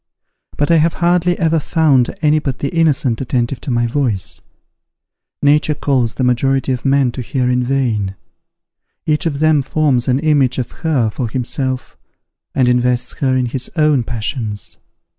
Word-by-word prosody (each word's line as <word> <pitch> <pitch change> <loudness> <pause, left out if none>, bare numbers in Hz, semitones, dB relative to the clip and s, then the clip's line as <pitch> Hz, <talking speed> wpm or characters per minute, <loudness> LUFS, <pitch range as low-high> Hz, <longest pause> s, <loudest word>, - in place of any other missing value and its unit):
But 145 +3 +1
I 165 - +5
have 160 +1 +2
hardly 175 0 +1
ever 165 -2 +2
found 145 -6 +2
any 150 0 +4
but 135 -4 -3
the 140 - -2
innocent 140 -8 +1
attentive 125 0 -1
to - - -6
my 120 -1 +1
voice. 120 -6 -2 1.0
Nature 150 +1 +3
calls 130 -6 0
the 130 - -2
majority 135 +2 +1
of 125 -2 -3
men 135 -2 +2
to 125 - -6
her 125 +1 -1
in 125 0 +1
vain. 120 -7 -1 0.9
Each 155 +2 +1
of 145 -3 -2
them 155 -1 +3
forms 135 -3 0
an 130 0 +2
image 145 -4 +2
of 125 - -3
her 135 -9 +1
for 120 +1 -3
himself, 130 +2 -3 0.6
and 130 -2 +3
invests 125 0 +1
her 130 -2 +1
with 125 -2 0
his 130 -1 -3
own 150 -4 +3
passions. 110 -2 -5
135 Hz, 160 wpm, -17 LUFS, 125-150 Hz, 1.0 s, I